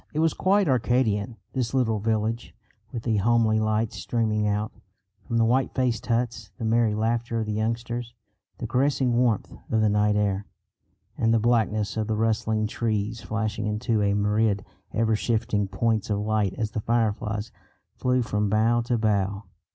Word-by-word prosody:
It 155 - -1
was 160 0 +3
quite 195 0 +2
Arcadian 120 -4 +1 0.2
this 130 -1 -1
little 115 -5 +1
village, 110 +2 -1 0.4
with 115 -2 -5
the 110 -3 +1
homely 110 +1 +3
lights 110 0 0
streaming 110 -3 0
out 105 +1 -1 0.6
from 115 - 0
the 115 - +4
white 130 +3 +1
faced 125 -4 0
huts, 115 -3 -1
the 115 - -4
merry 110 -1 +2
laughter 115 +1 0
of 110 - -1
the 105 - -3
youngsters, 115 +2 -3 0.4
the 120 - -5
caressing 130 +1 +1
warmth 120 -4 +1 0.2
of 110 - +2
the 110 - +3
night 105 0 +2
air, 100 -1 0 0.7
and 115 - +3
the 115 - +4
blackness 110 -2 +1
of 110 -1 -1
the 110 - 0
rustling 110 -1 +1
trees 110 0 -2
flashing 110 -1 -2
into 110 +1 0
a 100 0 +2
myriad 105 0 +1 0.3
ever 110 0 +1
shifting 110 -2 0
points 110 +2 0
of 105 - +1
light 105 -2 0
as 110 -1 -2
the 110 - -3
fireflies 110 -1 -1 0.4
flew 125 0 +1
from 105 -2 -1
bough 115 +3 +3
to 120 0 0
bough. 100 -2 0
110 Hz, 165 wpm, -25 LUFS, 105-120 Hz, 0.7 s, the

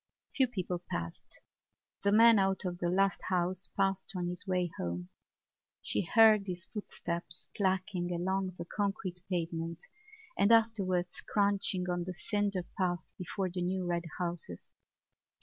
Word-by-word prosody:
Few 265 -2 +4
people 185 -6 -3
passed. 85 0 -5 0.6
The 200 - +2
man 225 0 +7
out 195 0 +1
of 175 -1 -3
the 175 - 0
last 195 +2 +2
house 185 +1 0
passed 195 0 +1
on 175 -1 -1
his 180 +3 -5
way 180 -2 +1
home; 90 +1 -3 0.7
she - - 0
heard 215 +1 +6
his 180 -1 -4
footsteps 175 -5 -5
clacking 185 -2 0
along 185 +1 -1
the 170 - -5
concrete 195 -2 -2
pavement 165 -1 -2 0.5
and 200 +3 +4
afterwards 195 -6 +2
crunching 200 -3 +1
on 175 -1 -1
the 185 0 -5
cinder 205 -2 0 0.2
path 175 -3 -1
before 185 +1 -2
the 180 0 -3
new 185 +1 -1
red 175 -1 -1
houses. 170 - -5
185 Hz, 140 wpm, -32 LUFS, 175-195 Hz, 0.7 s, man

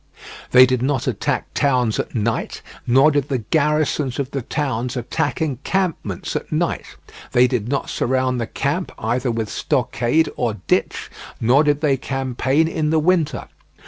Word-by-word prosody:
They 130 0 +8
did 130 -1 0
not 130 -1 0
attack - - -2
towns 125 -5 +1
at - - -4
night, 115 0 -2 0.2
nor 135 +5 +5
did 145 -1 0
the 135 - +1
garrisons 150 +1 0
of 140 -1 -3
the 135 - -2
towns 125 -2 -2
attack 145 +6 -1
encampments 150 - -2
at - - -4
night; - - -2 0.4
they 125 +1 +6
did 125 -4 -1
not 140 0 -1
surround 130 -1 0
the 115 - -2
camp 150 +10 -2
either 120 +3 -1
with 115 -2 -2
stockade 125 +7 0
or 115 -4 -1
ditch, - - 0 0.3
nor 125 +6 +4
did 145 -1 +1
they 140 -3 +2
campaign 135 +3 0
in 160 -2 -1
the 160 - +2
winter. 165 -1 +1
130 Hz, 155 wpm, -21 LUFS, 120-150 Hz, 0.4 s, They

